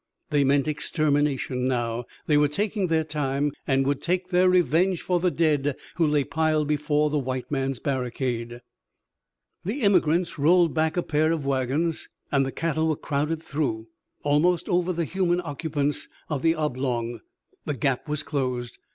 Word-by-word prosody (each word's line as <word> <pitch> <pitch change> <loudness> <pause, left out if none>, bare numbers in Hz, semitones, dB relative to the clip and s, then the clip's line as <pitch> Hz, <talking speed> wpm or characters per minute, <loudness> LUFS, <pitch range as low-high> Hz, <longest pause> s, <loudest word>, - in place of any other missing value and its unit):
They 145 -1 +3
meant 140 +1 +2
extermination 145 -4 0
now. 120 -2 -1 0.2
They 150 - +2
were 145 0 +5
taking 200 +5 -1
their 160 -1 +2
time 145 -2 -1 0.2
and 135 -1 +2
would 140 0 0
take 180 +1 -1
their 185 0 +4
revenge 180 +1 +2
for 180 -1 +1
the 180 +1 +2
dead 150 -5 +1 0.2
who 165 -2 +3
lay 150 -1 +2
piled 155 0 0
before 150 0 +1
the 150 - +1
white 130 0 -4
man's 135 -2 -1
barricade. 120 -2 -3 1.0
The 225 +9 -3
emigrants 175 -4 +2
rolled 170 +3 +4
back 160 +1 0
a 175 - +1
pair 155 +1 +1
of 160 -4 -2
wagons, 140 +5 -1 0.2
and 140 -1 +3
the - - -3
cattle 160 +1 -1
were 155 - +1
crowded 150 +3 -2
through, 125 -8 -2 0.3
almost 155 +4 +2
over 180 -1 +1
the 170 -1 -1
human 180 0 +1
occupants 145 -3 -2 0.2
of 145 -4 -2
the 165 0 +3
oblong. 125 -6 -2 0.5
The 150 - -2
gap 135 +4 -1
was 150 0 -2
closed. 125 -4 -3
150 Hz, 160 wpm, -25 LUFS, 135-165 Hz, 1.0 s, were